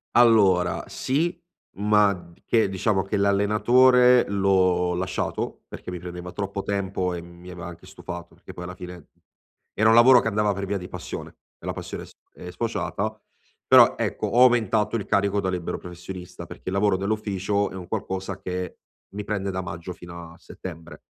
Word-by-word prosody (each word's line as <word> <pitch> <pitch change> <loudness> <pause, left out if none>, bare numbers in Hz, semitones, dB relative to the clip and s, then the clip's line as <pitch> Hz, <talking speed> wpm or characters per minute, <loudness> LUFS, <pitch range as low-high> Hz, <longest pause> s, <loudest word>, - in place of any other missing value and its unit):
Allora, 100 -7 +4
sì, 155 +6 -1 0.4
ma 105 0 +4
d 85 -2 -14
che 115 -3 +2
diciamo 95 +1 0
che 100 +2 -3
l'allenatore 120 +6 +5
l'ho 95 -3 +2
lasciato, 90 +1 -3
perché - - -8
mi 90 - -5
prendeva 90 0 -7
troppo 100 0 -4
tempo 95 -2 -1
e 85 - -4
mi 85 +1 -12
aveva 85 -1 -8
anche 85 +1 -11
stufato, 85 -2 -9
perché - - -13
poi 90 - -8
alla 90 0 -6
fine 90 -3 -10 0.6
era 110 +2 +3
un - - +6
lavoro 125 +2 +8
che - - -2
andava 105 -1 +1
per 100 0 -4
via 100 0 -2
di 90 - -8
passione, - - -7 0.2
e - - -13
la - - -2
passione - - -6
è - - -10
sf - - -23
è 90 - -9
sfociata 110 -1 -3 0.5
però - - +7
ecco, - - -1
ho 120 - +3
aumentato 115 -3 +3
il 105 - -2
carico 100 0 +1
da 95 -2 -1
libero 90 -2 -3
professionista, 90 0 -9
perché - - -12
il 95 - -2
lavoro 100 -1 +2
dell'ufficio 100 0 -1
è - - -10
un 90 -2 -8
qualcosa 95 -2 -4
che 90 0 -5 0.3
mi 105 +1 -6
prende 100 -2 -2
da 95 0 -3
maggio 85 0 -6
fino 85 -2 -10
a - - -18
settembre, 85 -2 -10
95 Hz, 180 wpm, -24 LUFS, 90-105 Hz, 0.6 s, lavoro